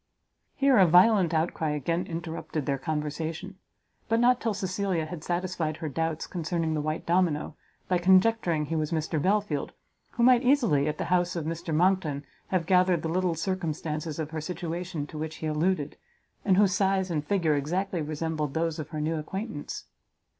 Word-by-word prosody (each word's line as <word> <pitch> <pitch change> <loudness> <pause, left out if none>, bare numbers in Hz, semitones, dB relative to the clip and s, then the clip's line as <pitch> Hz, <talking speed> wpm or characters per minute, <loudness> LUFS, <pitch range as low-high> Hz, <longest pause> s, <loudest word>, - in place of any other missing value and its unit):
Here 275 -4 +4
a 185 - +7
violent 180 +1 +5
outcry 160 -1 0
again 165 +5 -1
interrupted 165 -3 -4
their 140 -1 -1
conversation; 160 +6 -4 0.5
but 225 0 +3
not 245 +1 +4
till 225 -3 0
Cecilia 185 -3 -1
had 160 -1 -7
satisfied 175 -3 -2
her 160 - -4
doubts 160 +2 -2
concerning 165 -2 -2
the 155 - 0
white 155 +1 -3
domino, 170 -4 +1 0.3
by 180 -1 +2
conjecturing 185 -3 +3
he 160 - -3
was 155 -1 0
Mr 155 -1 -1
Belfield, 195 -5 0 0.4
who 235 - 0
might 250 -1 +6
easily, 235 - +3
at 150 0 -2
the - - -2
house 180 0 +2
of 165 -3 -3
Mr 165 +1 -4
Monckton, 160 -3 +2 0.2
have 185 -3 0
gathered 180 -1 +3
the 165 - -1
little 180 0 +1
circumstances 160 -3 -3
of 155 -1 -4
her 160 -1 -3
situation 170 -1 -4
to 150 +1 -8
which 160 0 -4
he - - -6
alluded, 155 -1 0 0.5
and 190 -3 +3
whose 200 -2 +4
size 190 -1 +1
and 150 -3 -1
figure 170 -2 +1
exactly 175 +5 -1
resembled 155 -1 -3
those 165 0 -1
of 155 - -5
her 155 - -5
new 160 +2 -1
acquaintance. 190 0 -5
165 Hz, 175 wpm, -27 LUFS, 155-185 Hz, 0.5 s, a